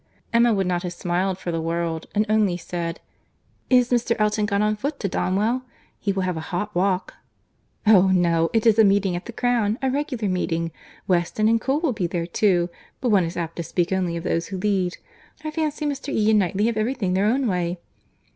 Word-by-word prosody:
Emma 235 0 +5
would 195 -3 +1
not 180 -1 0
have 180 -1 -4
smiled 180 +2 -1
for 180 -2 -4
the 165 -1 -2
world, 165 0 -2
and 210 +1 +3
only 210 -4 +2
said, 170 -1 -4 0.7
"Is 250 -1 +4
Mr. 235 -1 +2
Elton 210 -1 +1
gone 200 0 +1
on 215 0 +1
foot 280 +6 -4
to 200 - -1
Donwell?—He 215 +3 -2
will 190 -1 -1
have 180 -2 -1
a 160 - -6
hot 205 +4 -3
walk." 185 +1 0 0.7
"Oh! 195 -3 +6
no, 170 -3 +2
it 225 -1 +1
is 225 -1 +5
a - - +8
meeting 195 -2 +3
at 175 - -6
the - - -5
Crown, 235 -3 +1
a 265 -1 0
regular 265 -6 -2
meeting. 165 -3 -1 0.4
Weston 180 +4 +1
and 225 0 +3
Cole 270 +5 0
will 315 -7 +1
be 185 -5 -1
there 170 -1 -2
too; 175 -1 +1 0.3
but 250 - 0
one 195 -5 +4
is 165 +2 -5
apt 165 -1 -4
to 170 - -2
speak 175 +2 -1
only 180 -3 0
of 165 - -6
those 170 -2 -1
who 195 - -5
lead.—I 200 - -3
fancy 305 -1 -2
Mr. 285 -1 -3
E. 220 -3 +2
and 215 - +5
Knightley 195 +2 +1
have 230 -1 0
every 225 +5 0
thing 190 -7 -1
their 195 +2 +2
own 260 +4 +1
way." 180 -4 -1
200 Hz, 210 wpm, -23 LUFS, 175-225 Hz, 0.7 s, a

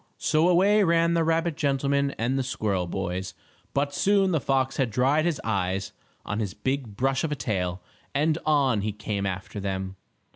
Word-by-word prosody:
So 160 +3 +2
away 200 +4 +4
ran 170 -1 +3
the 165 -1 +2
rabbit 165 0 +1
gentleman 140 -2 0
and 120 +4 0
the 135 - +1
squirrel 105 -8 -1
boys, 90 0 -4 0.4
but 140 0 0
soon 195 +3 +3
the 160 -5 +1
fox 130 0 0
had 130 -4 +1
dried 135 +8 +2
his 170 -5 0
eyes 95 -3 -1 0.3
on 105 - -2
his 100 -5 -3
big 125 -2 -3
brush 135 +1 +1
of 160 - -1
a - - 0
tail, 90 -7 -2 0.3
and 155 +3 +2
on 140 -8 +2
he 105 +1 -2
came 105 -1 -3
after 95 +2 -5
them. 95 -1 -3
135 Hz, 180 wpm, -26 LUFS, 100-155 Hz, 0.4 s, away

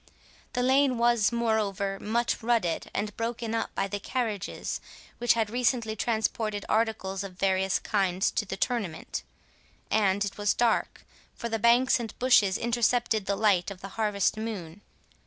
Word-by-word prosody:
The 250 - 0
lane 265 0 +3
was 235 -3 +3
moreover 210 -4 0
much 235 +3 -1
rutted 225 -8 0
and 210 -1 -3
broken 230 0 -3
up 230 - -1
by 195 - 0
the 205 +1 -4
carriages 215 -3 -3 0.4
which 240 -2 +4
had 220 -2 -1
recently 235 -2 0
transported 220 -1 -1
articles 205 -3 0
of 185 -2 -9
various 190 -1 +2
kinds 190 -3 0
to - - 0
the 195 -1 -6
tournament; 195 -6 -2 0.7
and 200 -1 +2
it 200 - -6
was 205 0 +2
dark, 235 -2 0 0.3
for 235 - -5
the 225 0 -1
banks 240 +4 +4
and 225 -3 -6
bushes 215 -7 +4
intercepted 235 -2 +1
the 200 - +1
light 200 -4 +2
of 195 -2 -9
the 195 - -7
harvest 210 -1 0
moon. 205 -5 -5
220 Hz, 155 wpm, -28 LUFS, 195-235 Hz, 0.7 s, which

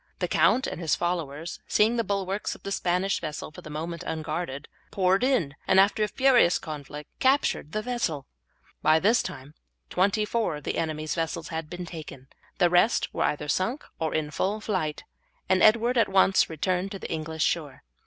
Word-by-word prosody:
The - - -1
count 260 - +3
and - - -5
his 165 - +2
followers, 170 -2 -3
seeing 220 +3 +3
the 230 - +1
bulwarks 195 0 -2
of - - -17
the 200 - -5
Spanish 185 +1 0
vessel 155 -1 -5
for - - -11
the - - -10
moment 165 +2 -5
unguarded, 155 -2 -4 0.2
poured 190 +2 +2
in, 245 - +2
and 190 - +5
after 200 +2 +4
a 210 - +3
furious 255 -7 +4
conflict 150 -3 -8
captured 265 - +2
the 215 +3 -2
vessel. 195 - -2 0.6
By 155 +1 +4
this 220 +7 +3
time 135 +2 -8 0.4
twenty 200 +3 +2
four 220 -7 -1
of 150 - -9
the - - -2
enemy's 155 -1 -2
vessels 165 0 -3
had 160 -1 -4
been 180 +1 -6
taken, 155 -6 -9 0.3
the 175 - +4
rest 180 +7 +3
were - - 0
either 150 0 -2
sunk 190 - -1
or 160 -1 -1
in 155 -1 -1
full 200 +7 -1
flight, 185 -8 -2 0.4
and 185 -1 +3
Edward 235 +3 +5
at 225 - +3
once 190 0 +4
returned 180 +4 -1
to - - -4
the - - -7
English 160 -1 -2
shore. 150 -5 -2
175 Hz, 185 wpm, -27 LUFS, 155-205 Hz, 0.6 s, and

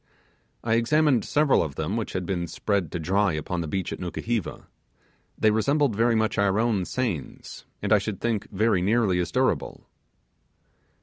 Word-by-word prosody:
I 115 0 +2
examined 135 0 +3
several 150 -2 +3
of 75 -5 -4
them 80 +7 -2
which 115 -2 -3
had 90 -1 -2
been 85 -2 -2
spread 95 0 -1
to - - -3
dry 95 +3 +1
upon 80 +3 -3
the 80 - -4
beach 95 +3 -3
at - - -7
Nukuheva. 105 +4 -3 0.7
They 110 - +3
resemble 140 +7 +2
very 115 +2 +2
much 110 -1 0
our 100 0 +2
own 110 -5 +1
seines, 110 - -4 0.2
and 105 +1 +2
I 105 - +6
should 100 0 -4
think 115 -3 -1
they 105 +3 +1
were 100 -6 +2
nearly 100 -2 +2
as 90 - -2
durable. - - -1
105 Hz, 175 wpm, -25 LUFS, 90-115 Hz, 0.7 s, I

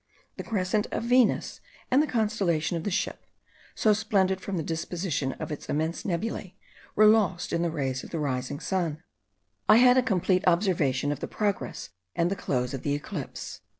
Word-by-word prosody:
The - - -5
crescent 210 0 0
of - - -3
Venus, 245 -1 +2 0.3
and 265 +3 +5
the 305 - 0
constellation 200 - 0
of 165 - -4
the - - +1
Ship, 195 - -2 0.5
so 215 - +4
splendid 195 -3 +1
from 195 -1 -3
the 160 - -1
disposition 165 -3 -2
of - - -6
its 150 - -7
immense 160 +3 -1
nebulae, 190 +1 -3 0.4
were 215 - +6
lost 210 -5 +3
in 170 - +1
the 170 - +1
rays 135 -5 -2
of - - -9
the 165 - -4
rising 135 -2 -2
sun. 170 -4 -2 0.7
I 215 - +9
had 250 +1 +7
a - - +4
complete 190 -5 +1
observation 155 -7 +2
of 145 - -3
the - - -4
progress 200 - -2 0.3
and 170 +2 +1
the - - 0
close 125 -8 -2
of 135 - -4
the 145 -1 0
eclipse. 145 -1 -6
180 Hz, 185 wpm, -27 LUFS, 155-210 Hz, 0.7 s, I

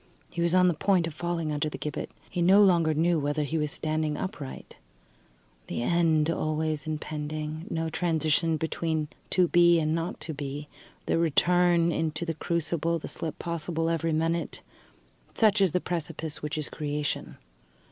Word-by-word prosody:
He 170 - -3
was 170 +1 +3
on 180 0 +6
the 175 - +3
point 180 +2 +2
of 165 - -5
falling 170 -1 -2
under 150 +1 -1
the - - -7
gibbet. 150 -2 -4 0.2
He 180 - -3
no 190 +4 +7
longer 170 -5 +4
knew 165 +1 +2
whether 145 +1 0
he 155 +3 -1
was 150 -1 0
standing 155 -1 -1
upright. 165 -9 -6 0.9
The 120 - -3
end 160 0 +3
always 155 -1 -1
impending, 155 +1 -4
no 165 0 -1
transition 160 -1 +1
between 160 -1 -2 0.2
to 180 -2 +3
be 175 -1 +6
and 155 0 +1
not 165 +1 -2
to 160 - -3
be, 145 0 -5 0.4
the - - +1
return 170 +1 +3
into 160 0 -1
the 165 - -1
crucible, 170 0 -1
the 160 - -7
slip 160 -2 -5
possible 165 -1 -2
every 165 0 0
minute 165 +2 -1 0.7
such 210 -2 +4
is 190 -4 +4
the 180 - +1
precipice 160 -3 -3
which 150 +1 -3
is 155 - -3
Creation. 150 -1 -3
160 Hz, 165 wpm, -28 LUFS, 155-170 Hz, 0.9 s, no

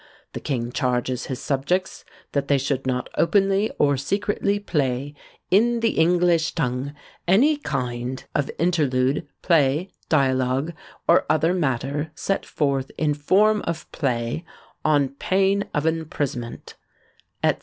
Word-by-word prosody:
The - - -4
king 120 -3 -2
charges 125 -1 -1
his 130 - -4
subjects 150 +8 -1 0.3
that 140 -1 -1
they 140 - +4
should 135 -1 -2
not 125 -1 -1
openly 195 +3 +3
or 145 -1 +3
secretly 200 +7 0
play 140 -7 -1 0.4
in 235 +5 +4
the 230 - +3
English 170 0 +3
tongue 135 -1 -2 0.3
any 250 - +5
kind 125 - -3
of 145 -2 0
Interlude, 145 -5 +1 0.2
Play, 160 +1 +2 0.2
Dialogue, 135 +1 +1 0.3
or - - +4
other 155 +3 +3
matter 145 -1 -1
set 195 - -2
forth 140 -3 0
in 150 -1 +1
form 205 +9 +3
of 165 -2 -4
Play, 120 +1 -1 0.4
on 145 -3 +3
pain 195 +8 +1
of 150 +1 -1
imprisonment," 145 -7 -3 0.7
&c. - - +6
145 Hz, 125 wpm, -23 LUFS, 130-180 Hz, 0.7 s, c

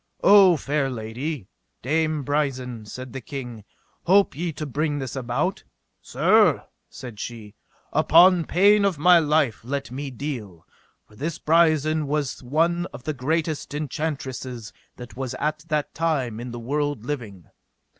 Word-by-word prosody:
O 195 -4 +7
fair 140 -1 -1
lady, 120 - -5 0.4
Dame 155 +2 0
Brisen, 130 -6 -2
said 125 +2 -8
the 135 - -5
king, 125 -6 -7 0.4
hope 195 -3 +4
ye 170 +3 -2
to 155 - -5
bring 145 +2 -1
this 135 -2 -5
about? 135 +8 -2 0.4
Sir, - - +3 0.2
said 120 -5 -10
she, 110 -3 -7 0.4
upon 170 +3 +5
pain 200 +4 +4
of 195 -5 +1
my 175 +3 +6
life 150 -7 +1
let 135 0 -4
me 140 +2 -5
deal; 120 - -6 0.4
for 105 - -20
this 150 +7 -4
Brisen 155 -2 +2
was 145 -2 -2
one 165 +7 0
of 125 - -10
the 155 - -2
greatest 155 +2 -2
enchantresses 135 -6 -4 0.2
that 120 -1 -11
was 130 -1 -4
at 155 +2 -2
that 150 -2 -1
time 135 -9 -1
in 120 +1 -6
the 120 - -7
world 145 -1 -2
living. 110 - -5
145 Hz, 145 wpm, -24 LUFS, 125-155 Hz, 0.4 s, O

